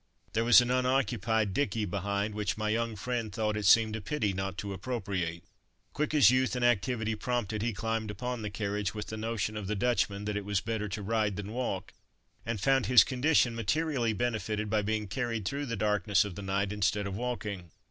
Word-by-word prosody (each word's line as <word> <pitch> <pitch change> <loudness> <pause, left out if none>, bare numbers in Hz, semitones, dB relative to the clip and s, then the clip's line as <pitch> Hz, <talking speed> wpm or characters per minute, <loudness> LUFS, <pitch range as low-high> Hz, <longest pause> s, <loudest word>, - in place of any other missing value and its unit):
There 115 - +1
was 120 +1 +8
an 120 0 -1
unoccupied 120 -5 +1
dicky 110 -3 0
behind, 100 +2 -2
which 105 0 -2
my 110 0 -1
young 115 0 0
friend 115 +1 -3
thought 105 +1 -1
it 105 -2 0
seemed 110 +1 +5
a 110 - -4
pity 105 -3 -1
not 95 0 -3
to 100 -2 -4
appropriate. 95 -6 -3 0.5
Quick 150 +1 -1
as 130 -7 +7
youth 130 0 +2
and 125 -1 +1
activity 115 -1 +1
prompted, 110 -2 -2
he 115 +2 0
climbed 110 +1 -2
upon 125 +4 -4
the 105 - -3
carriage 100 0 -2
with 105 -1 -4
the 110 - -4
notion 110 -1 -2
of 105 -2 -4
the 105 - -1
Dutchman 100 -2 0
"that 105 0 -2
it 105 - -3
was 100 -1 0
better 110 -1 -3
to 100 +1 -4
ride 105 -1 0
than 100 +2 -6
walk," 120 -7 -3 0.5
and 115 -2 -2
found 135 +4 +2
his 125 -5 +8
condition 130 -2 +2
materially 120 +1 0
benefited 110 -1 -2
by 110 -1 +2
being 105 +1 -1
carried 115 0 -2
through 140 +6 -2
the 115 - -2
darkness 105 0 +2
of 100 - -5
the 100 - -7
night 100 +1 -1
instead 105 0 0
of 100 -1 -4
walking. 105 -6 -4
110 Hz, 205 wpm, -30 LUFS, 100-120 Hz, 0.5 s, was